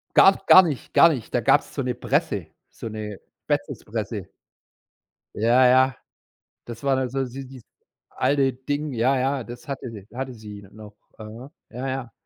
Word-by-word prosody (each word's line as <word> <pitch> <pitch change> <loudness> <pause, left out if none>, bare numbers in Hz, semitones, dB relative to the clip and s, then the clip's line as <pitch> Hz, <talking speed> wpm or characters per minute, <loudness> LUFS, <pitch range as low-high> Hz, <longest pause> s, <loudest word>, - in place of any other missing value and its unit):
Gab's 195 0 +6
gar 190 - +9
nicht 150 -7 -4
gar 165 - +7
nicht. 130 -9 -4
Da - - +2
gab's - - +2
so - - -2
'ne - - -1
Presse, - - -1 0.2
so - - -8
'ne 105 -2 -6 0.2
Spätzlepresse. - - -3 1.1
Ja, 120 +4 +4
ja. 130 0 +4 0.7
Das 120 +1 -9
war 135 -1 +2
dann 130 -1 -1
so 135 +1 -1
so 125 - -10
dies 130 -2 -12 0.5
alte 135 0 +1
Ding. 145 +3 -4
Ja, 125 +3 +2
ja, 135 0 0
das 120 +1 -11
hatte 135 -3 -5
sie 105 -3 -11
hatte 130 +1 -5
sie 105 -3 -10
n 100 0 -16
noch. 105 -1 -12 0.2
Mhm. 110 +5 -10 0.2
Ja, 125 +3 -5
ja, 130 -3 -4
130 Hz, 170 wpm, -24 LUFS, 115-135 Hz, 1.1 s, gar